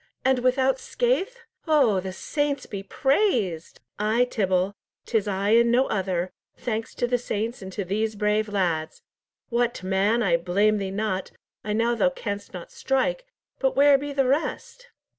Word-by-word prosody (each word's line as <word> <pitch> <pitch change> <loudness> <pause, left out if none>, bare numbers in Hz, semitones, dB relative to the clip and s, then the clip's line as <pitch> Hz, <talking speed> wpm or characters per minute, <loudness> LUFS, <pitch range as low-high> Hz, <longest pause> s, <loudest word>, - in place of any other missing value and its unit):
and 265 -1 +3
without 260 +1 +2
scathe? 485 - 0 0.3
Oh, 270 -11 +4
the 190 0 -5
saints 285 +7 -2
be 200 - -6
praised!" 225 - 0 0.2
"Ay, 220 +4 +2
Tibble, 190 -4 0 0.3
'tis 220 -3 0
I 200 0 -1
and 235 +1 +5
no 255 +3 +4
other, 185 -3 -1 0.3
thanks 225 -2 -4
to - - 0
the 245 0 0
saints 230 0 -3
and 190 0 -7
to 200 - -3
these 215 +4 -1
brave 210 +1 +1
lads! 170 -6 -1 0.5
What, 240 -3 0
man, 195 +5 +2
I 170 -5 +3
blame 200 +5 +2
thee 195 -1 -3
not, 195 -1 -2 0.3
I 210 - -2
know 230 +2 +2
thou 240 +3 +3
canst 205 -6 -5
not 180 -2 -9
strike; - - -1 0.3
but 265 -1 +1
where 280 0 +6
be 290 +1 -5
the 275 -1 +1
rest?" 330 - -2
220 Hz, 160 wpm, -25 LUFS, 195-265 Hz, 0.5 s, where